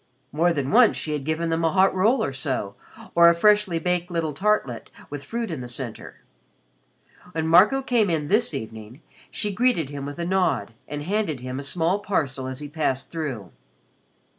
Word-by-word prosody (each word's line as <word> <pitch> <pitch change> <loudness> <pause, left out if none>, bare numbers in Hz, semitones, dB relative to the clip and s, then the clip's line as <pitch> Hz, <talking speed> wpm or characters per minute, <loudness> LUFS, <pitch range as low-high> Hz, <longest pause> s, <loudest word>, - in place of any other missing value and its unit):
More 170 +4 +2
than 140 -5 -2
once 230 +1 +5
she 155 - -2
had 145 -2 -3
given 160 +2 -1
them 165 0 0
a 165 - +2
hot 190 +2 +4
roll 220 +6 +2
or 135 - -2
so 130 -7 -3 0.4
or 170 0 +7
a 170 - +3
freshly 210 -1 +3
baked 180 +1 -1
little 165 -3 -2
tartlet 165 - 0 0.2
with 145 -1 -6
fruit 230 - -4
in 155 -6 -4
the 125 - -6
center. 120 -2 -7 1.1
When 160 -1 -1
Marco 205 +11 +5
came 230 -6 +2
in 155 -3 -1
this 210 +7 +2
evening, 110 +2 -8 0.3
she 210 -1 -2
greeted 220 - +1
him 140 -1 -5
with 145 - -7
a 170 - -3
nod 185 -9 0
and 145 0 -5
handed 185 - -1
him 130 +1 -5
a - - -4
small 170 +6 0
parcel 140 -10 -2
as 130 +2 -5
he 145 - -5
passed 145 -3 -2
through. 135 - -5
165 Hz, 190 wpm, -24 LUFS, 140-190 Hz, 1.1 s, or